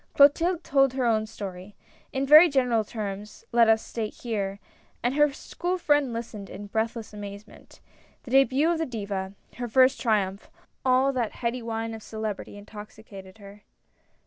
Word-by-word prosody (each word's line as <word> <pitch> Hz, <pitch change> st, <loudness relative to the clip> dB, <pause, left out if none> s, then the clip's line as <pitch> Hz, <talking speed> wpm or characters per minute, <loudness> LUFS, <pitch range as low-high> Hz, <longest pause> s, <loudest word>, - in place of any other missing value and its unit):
Clotilde 330 Hz, +5 st, +4 dB
told 270 Hz, -2 st, +3 dB
her 260 Hz, -2 st, -1 dB
own 220 Hz, -2 st, +1 dB
story 195 Hz, -1 st, -8 dB, 0.2 s
— -, -, -32 dB
in 270 Hz, +1 st, -1 dB
very 305 Hz, +5 st, +9 dB
general 250 Hz, -5 st, +2 dB
terms, 210 Hz, -1 st, -7 dB
let 235 Hz, -1 st, +5 dB
us 220 Hz, 0 st, +1 dB
here 220 Hz, -2 st, -1 dB
state 200 Hz, -4 st, -3 dB, 0.3 s
— -, -, -37 dB
and 245 Hz, +2 st, +1 dB
her 295 Hz, 0 st, +4 dB
school 355 Hz, +5 st, -4 dB
friend 290 Hz, -6 st, +2 dB
listened 230 Hz, -3 st, -6 dB
in 205 Hz, -, -8 dB
breathless 220 Hz, +1 st, -3 dB
amazement. 205 Hz, 0 st, -11 dB, 0.4 s
The 245 Hz, -, -10 dB
debut 270 Hz, +4 st, +4 dB
of 335 Hz, -, -1 dB
the 325 Hz, -, -1 dB
Diva, 200 Hz, -5 st, -4 dB, 0.2 s
her 245 Hz, 0 st, -3 dB
first 255 Hz, +3 st, +4 dB
triumph 200 Hz, -4 st, 0 dB, 0.2 s
— -, -, -46 dB
all 260 Hz, +1 st, +3 dB
that 240 Hz, -4 st, -2 dB
heady 240 Hz, +1 st, -3 dB
wine 225 Hz, 0 st, -4 dB
of 220 Hz, -, -8 dB
celebrity 215 Hz, -2 st, -6 dB
intoxi 210 Hz, +1 st, -12 dB
cated 190 Hz, 0 st, -12 dB
her. 200 Hz, 0 st, -13 dB
225 Hz, 175 wpm, -26 LUFS, 205-265 Hz, 0.4 s, very